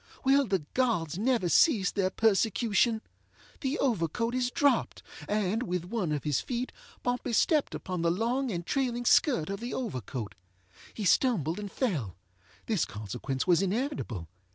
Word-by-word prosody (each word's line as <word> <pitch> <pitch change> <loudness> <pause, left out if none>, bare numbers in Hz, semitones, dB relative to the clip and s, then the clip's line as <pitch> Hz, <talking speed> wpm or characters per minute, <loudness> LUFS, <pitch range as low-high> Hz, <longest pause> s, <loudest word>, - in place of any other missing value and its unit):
Will 275 0 +4
the 190 -6 0
gods 195 - 0
never 235 -4 +2
cease 205 - +4
their 190 -2 +1
persecution? 220 +2 +2 0.6
The 275 +2 -1
overcoat 230 - 0
is 250 -1 +1
dropped, 285 +2 +1 0.3
and, 210 +1 0
with 180 -7 -2
one 190 -4 -2
of 150 -2 -2
his 150 -4 +1
feet, 250 0 -3 0.3
Pompey 245 -1 -1
stepped 300 - +2
upon 180 -2 -4
the 170 - +2
long 240 +9 0
and 170 -3 -4
trailing 245 -1 -1
skirt 215 - +3
of 200 - -4
the 240 +2 -4
overcoat. 130 - -4 0.6
He 210 - -3
stumbled 185 - +2
and 205 -1 -5
fellŌĆöthis 100 - -3
consequence 110 +5 -4
was 180 -1 +4
inevitable. 195 - -2
210 Hz, 145 wpm, -29 LUFS, 165-245 Hz, 0.6 s, Will